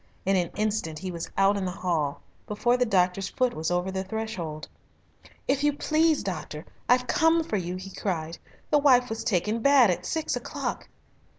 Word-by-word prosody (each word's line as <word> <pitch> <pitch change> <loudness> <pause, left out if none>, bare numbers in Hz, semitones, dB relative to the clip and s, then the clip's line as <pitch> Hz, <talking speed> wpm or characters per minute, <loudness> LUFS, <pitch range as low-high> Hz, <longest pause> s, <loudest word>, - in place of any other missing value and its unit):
In 195 +1 +3
an 175 -2 +1
instant 210 -7 -1
he 185 +3 -5
was 170 -1 -5
out 195 +1 +4
in 195 - -2
the - - -1
hall, 165 -6 -2 0.3
before 240 +4 +1
the 250 0 +1
doctor's 185 -1 +1
foot 255 -1 0
was 160 +1 -2
over 180 +2 0
the 190 0 -2
threshold. 190 -7 -5 0.8
"If 275 +1 +1
you 295 0 +3
please, 310 +1 +2
doctor, 155 -4 -5 0.2
I've 250 0 +4
come 325 +4 +3
for 215 - -2
you," 180 -1 -3
he 190 +1 -8
cried; 170 -5 -3 0.3
"the 295 - +5
wife 250 -4 +4
was 225 0 -4
taken 210 +3 0
bad 265 -4 +5
at 180 +1 -3
six 320 -1 -1
o'clock." - - -4
195 Hz, 185 wpm, -26 LUFS, 180-250 Hz, 0.8 s, the